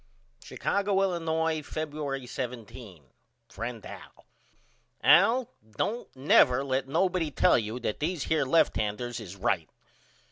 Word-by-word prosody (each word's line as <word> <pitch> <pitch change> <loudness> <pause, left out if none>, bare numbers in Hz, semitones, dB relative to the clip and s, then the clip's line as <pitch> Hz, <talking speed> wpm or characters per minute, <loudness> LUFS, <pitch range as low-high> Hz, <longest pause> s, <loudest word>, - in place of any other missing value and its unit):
Chicago, 200 -1 0
Illinois, 160 -3 0
Febuery 145 -4 -4
17. 120 - -7 0.5
FRIEND 115 -1 -6
AL: - - -12 0.8
Al 230 +7 +5 0.3
don't 235 +3 -2
never 130 -1 +4
let 135 -1 -1
nobody 180 +2 +1
tell 135 - +3
you 110 +2 -4
that 110 - -3
these 160 0 -2
here 160 -2 +1
lefthanders 120 -5 0
is 100 -4 -9
right. 95 -5 -1
135 Hz, 110 wpm, -28 LUFS, 120-165 Hz, 0.8 s, Al